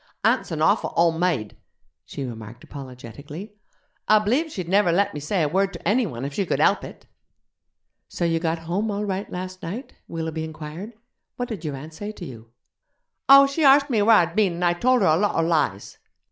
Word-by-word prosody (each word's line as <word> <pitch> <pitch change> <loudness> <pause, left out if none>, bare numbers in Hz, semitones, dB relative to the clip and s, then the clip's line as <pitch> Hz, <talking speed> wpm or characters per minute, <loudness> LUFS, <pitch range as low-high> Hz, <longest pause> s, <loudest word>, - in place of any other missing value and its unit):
'Aunt's - - +2
an - - -2
awful - - +2
ole 170 0 +5
maid,' 160 -12 -1 0.5
she 140 - -6
remarked 115 0 -9
apologetically; 140 - -10 0.5
'I 215 - +6
b'lieve 280 +10 +1
she'd 185 - -5
never 195 -1 +3
let 200 +4 +1
me 150 - -5
say 160 +4 -1
a - - +2
word 195 +5 +1
to 170 - -7
enny 235 +2 +2
one 125 -4 -6
if 140 - -5
she 200 - 0
could - - -1
help - - +3
it.' - - -11 1.0
'So 175 - -3
you 165 -1 +1
got 165 0 -1
home 175 +7 -2
all 205 0 -2
right 195 0 -4
last 185 +1 -6
night?' 215 +11 -6
Willoughby 160 -1 -4
inquired; 160 +7 -8 0.4
'what 245 0 -4
did 205 -8 -6
your 150 -3 -3
aunt 155 +4 -9
say 205 +6 -6
to 185 - -9
you?' 115 -5 -11 0.8
'Oh, 275 0 +10
she 275 +3 -1
arst 280 0 +6
me 220 -3 +2
where 225 +2 +6
I'd 170 -3 +2
been, 205 -5 +2
and 175 +1 -2
I 175 - +3
tolder 245 +3 +2
a 155 - +4
lotter 165 -3 +1
lies.' 155 - -1
175 Hz, 200 wpm, -23 LUFS, 155-205 Hz, 1.0 s, Oh